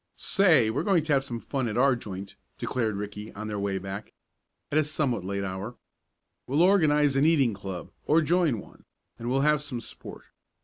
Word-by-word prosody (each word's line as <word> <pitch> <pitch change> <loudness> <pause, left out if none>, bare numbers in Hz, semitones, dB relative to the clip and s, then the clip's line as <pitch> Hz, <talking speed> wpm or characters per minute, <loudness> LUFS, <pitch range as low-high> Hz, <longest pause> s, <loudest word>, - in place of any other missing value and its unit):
"Say, 170 - +4
we're 125 - -1
going 190 -6 +2
to 155 -1 +1
have 135 -1 +3
some 120 -4 -5
fun 130 +1 -2
at 110 - -3
our 135 +1 +4
joint," 100 -4 -7 0.2
declared 110 -5 -1
Ricky 105 +1 -6
on 110 +2 -6
their 105 -1 -3
way 100 -1 -1
back, 95 +2 -7 0.6
at 150 - +3
a - - +3
somewhat 140 -8 -1
late 100 +1 -3
hour. 100 +5 -5 0.7
"We'll 145 +6 +3
organize 150 -7 +4
an 135 - +3
eating 140 -8 +4
club, 95 -3 -7 0.2
or 160 +2 +4
join 160 - +2
one, - - -15 0.3
and 120 +1 -4
we'll 135 +2 +2
have 150 0 +3
some 135 -5 -4
sport. 115 - -9
125 Hz, 190 wpm, -27 LUFS, 105-150 Hz, 0.7 s, Say